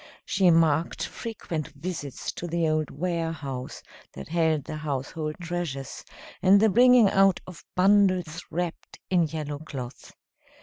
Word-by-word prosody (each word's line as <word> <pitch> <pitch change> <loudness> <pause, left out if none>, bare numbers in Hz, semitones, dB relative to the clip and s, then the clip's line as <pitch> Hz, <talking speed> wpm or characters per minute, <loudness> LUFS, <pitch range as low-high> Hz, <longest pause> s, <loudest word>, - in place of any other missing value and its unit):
She 190 -2 +3
marked 165 -1 +2
frequent 175 - -5
visits 145 -3 -5
to 175 - -6
the 170 -1 0
old 155 -1 0
warehouse 160 -5 -4 0.3
that 70 - -8
held 160 -3 +1
the 155 - -6
household 150 +1 -3
treasures, 165 -6 -4 0.4
and 195 +2 +6
the 220 +1 +5
bringing 245 +1 +6
out 195 -1 +4
of 180 -2 -11
bundles 185 -3 +3
wrapped 175 0 -4
in 175 -3 +3
yellow 150 -2 -5
cloth. 135 -5 -8
165 Hz, 130 wpm, -26 LUFS, 150-185 Hz, 0.4 s, and